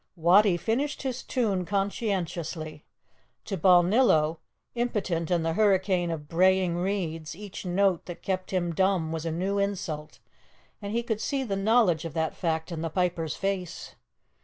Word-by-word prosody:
Wattie 180 +3 +5
finished 265 +11 -1
his 260 -1 -3
tune 205 -7 0
conscientiously. 175 -6 -3 0.6
To 195 - -3
Balnillo, 175 -2 +4 0.3
impotent 200 -9 -1
in 175 -2 +1
the 165 0 0
hurricane 190 -3 +2
of 155 -3 -5
braying 185 +1 +3
reeds, 170 -5 -2
each 200 -1 -8
note 185 -1 +1
that 175 - -8
kept 185 -1 -2
him 175 -3 -1
dumb 185 -3 +1
was 165 0 -3
a - - -1
new 190 +5 -1
insult, 175 -6 -3 0.6
and 200 0 -5
he 235 +2 0
could 220 -2 -2
see 275 -1 -1
the 205 -6 -2
knowledge 195 -5 +3
of 165 -3 -6
that 160 -1 -1
fact 160 -1 -2
in 165 -2 -4
the 165 - -2
piper's 170 -2 -1
face. 195 -3 -3
185 Hz, 155 wpm, -27 LUFS, 165-200 Hz, 0.6 s, Wattie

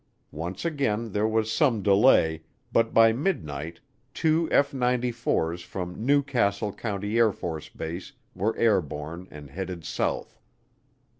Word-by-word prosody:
Once 85 - -5
again 115 -9 -1
there 105 +2 +1
was 110 0 0
some 120 - +2
delay, 100 -6 +4 0.3
but 115 0 +3
by 115 0 +6
midnight 85 - -3 0.4
two 160 +1 +2
F 140 0 +4
94's 120 -9 0
from 90 +3 -6
New 140 +3 +4
Castle 105 -6 0
County 105 -1 -4
AFB 85 -5 -1 0.2
were 110 +4 -1
airborne 85 -5 0
and 75 -2 -11
headed 90 0 -5
south. - - -2
105 Hz, 120 wpm, -26 LUFS, 85-120 Hz, 0.4 s, by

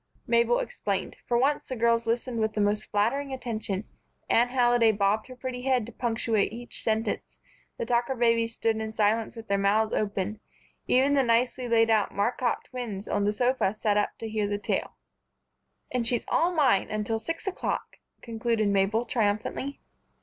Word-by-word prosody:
Mabel 235 0 +3
explained. 200 -2 -3
For 240 - +2
once, 280 +5 +1
the 260 - -2
girls 230 0 +2
listened 235 +1 -1
with 220 0 0
the - - -3
most 210 +1 0
flattering 255 +7 0
attention. 220 -6 -3 0.5
Anne 240 +1 +5
Halliday 240 -2 +4
bobbed 205 +1 +1
her 255 - -10
pretty 250 0 -5
head 255 -3 +1
to 235 - -10
punctuate 225 -3 0
each 240 +2 -5
sentence, 220 0 -2 0.4
the - - -2
Tucker 240 +2 +1
babies 230 -1 +2
stood 225 -1 0
in 220 0 -4
silence 220 +2 +1
with 225 0 -9
their 200 0 +1
mouths 215 +2 +2
open, 205 0 -1 0.5
even 270 +3 +4
the 280 - +4
nicely 245 +1 +1
laid 225 -1 +4
out 215 -2 +2
Marcotte 240 +4 0
twins 220 -6 -6
on 205 0 0
the 205 - +3
sofa 245 -2 +1
sat 210 -1 +1
up 210 - 0
to 225 - -5
hear 215 -1 -1
the 205 0 -1
tale. 205 - -3 0.9
"And 240 -2 0
she's 240 -1 0
all 345 +2 +2
mine 275 - +3
until 215 +1 -1
six 330 - -5
o'clock," 385 - -3 0.3
concluded 230 -2 0
Mabel, 200 +4 +2
triumphantly. 230 +5 -1
230 Hz, 170 wpm, -27 LUFS, 215-245 Hz, 0.9 s, Anne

